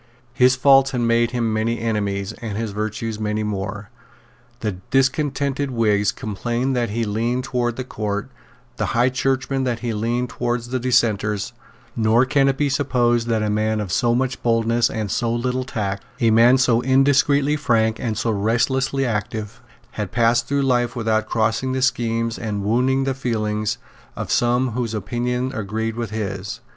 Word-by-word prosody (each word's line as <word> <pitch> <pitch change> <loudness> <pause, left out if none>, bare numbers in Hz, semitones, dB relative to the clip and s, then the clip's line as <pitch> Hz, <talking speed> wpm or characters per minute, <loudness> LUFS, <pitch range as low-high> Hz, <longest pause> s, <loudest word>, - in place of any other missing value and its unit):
His 125 +1 +4
faults 135 +1 +5
had 125 -3 -2
made 115 0 +2
him 120 -2 -1
many 115 +2 0
enemies, 100 -3 -2
and 110 -3 -4
his 110 -1 -3
virtues 110 +1 -3
many 105 0 -1
more. 100 0 -4 0.7
The 105 -4 -2
discontented 140 +1 +1
Whigs 105 -4 +2
complained 120 +5 -2
that 120 -1 0
he 115 +3 -1
leaned 115 +4 -1
towards 120 -2 -1
the 130 - -3
Court, 105 0 -4 0.5
the - - -1
High 120 +2 +4
Churchmen 135 +1 -1
that 120 -2 -2
he 120 -2 -2
leaned 120 +3 -1
towards 120 0 -2
the 130 0 -1
Dissenters; 105 -4 +1 0.4
nor 115 +2 +3
can 135 +1 +2
it 135 -1 +1
be 145 - +1
supposed 120 -4 +1
that 110 -2 +1
a 105 - 0
man 110 +1 0
of 100 -4 -4
so 120 +4 +2
much 130 +1 -1
boldness 115 0 +2
and 110 -2 -3
so 115 -2 0
little 125 +2 -1
tact, 100 -5 -3 0.2
a 115 -3 +3
man 120 +4 +6
so 125 -3 +3
indiscreetly 140 +2 +3
frank 115 -6 +1
and 110 -3 -2
so 115 - 0
restlessly 130 +6 +1
active, 110 -1 -3 0.3
had 105 -3 -4
passed 120 0 +2
through 140 0 +1
life 120 -2 +1
without 110 -2 0
crossing 115 +4 0
the 130 - -1
schemes 115 -3 0
and 105 -3 -3
wounding 125 +5 +2
the 135 0 0
feelings 110 -5 -2 0.4
of - - -5
some 120 +1 +2
whose 115 -1 -2
opinions 125 +5 -2
agreed 110 0 -3
with 115 -1 -3
his. 100 -2 -4
115 Hz, 170 wpm, -21 LUFS, 110-130 Hz, 0.7 s, man